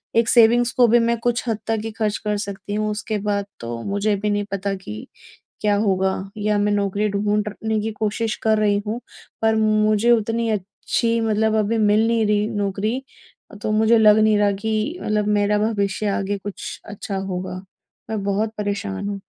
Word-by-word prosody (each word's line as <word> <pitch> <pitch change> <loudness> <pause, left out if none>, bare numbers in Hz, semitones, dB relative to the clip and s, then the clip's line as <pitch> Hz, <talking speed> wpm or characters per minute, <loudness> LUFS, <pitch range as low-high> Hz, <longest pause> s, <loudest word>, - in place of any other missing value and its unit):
एक 230 0 +3
सेविंग्स 240 +1 +5
को 245 -1 +4
भी 235 +2 +5
मैं 235 0 +1
कुछ 240 +1 -1
हद 225 -2 0
तक 225 -1 0
ही 225 - -4
खर्च 215 -1 -1
कर 210 -1 -2
सकती 200 0 -5
हूँ, 215 0 0
उसके 215 0 -3
बाद 200 -1 0
तो 115 0 -5
मुझे 205 +1 0
भी 210 +1 -2
नहीं 205 0 0
पता 195 0 -2
कि 110 - -8 0.5
क्या 210 -1 +2
होगा? 190 -2 +1 0.2
या 210 0 0
मैं 205 0 +1
नौकरी 205 +1 0
ढूँढ 210 +1 0
रखने 220 +1 -2
की 220 - -2
कोशिश 215 +1 -2
कर 220 -1 +3
रही 205 -1 +2
हूँ। 225 +3 -3 0.4
पर 220 0 +3
मुझे 215 +1 +3
उतनी 230 +1 +1
अच्छी 220 +3 -1
मतलब 220 0 +1
अभी 215 +2 +1
मिल 215 +1 +3
नहीं 230 -2 +2
रही 210 0 +2
नौकरी 205 +4 -2 0.5
अ, - - -12
तो 210 - -4
मुझे 220 +2 +4
लग 215 0 +6
नहीं 215 -1 +4
रहा 205 -1 +3
कि 220 - -2
मतलब 210 -1 0
मेरा 205 +1 +2
भविष्य 210 -1 -1
आगे 200 0 -1
कुछ 200 0 -7
अच्छा 200 -1 -6
होगा। 185 -1 -4 0.5
मैं 215 -2 -2
बहुत 210 +2 0
परेशान 200 - -3
हूँ। 200 -1 -4
210 Hz, 190 wpm, -22 LUFS, 200-220 Hz, 0.5 s, लग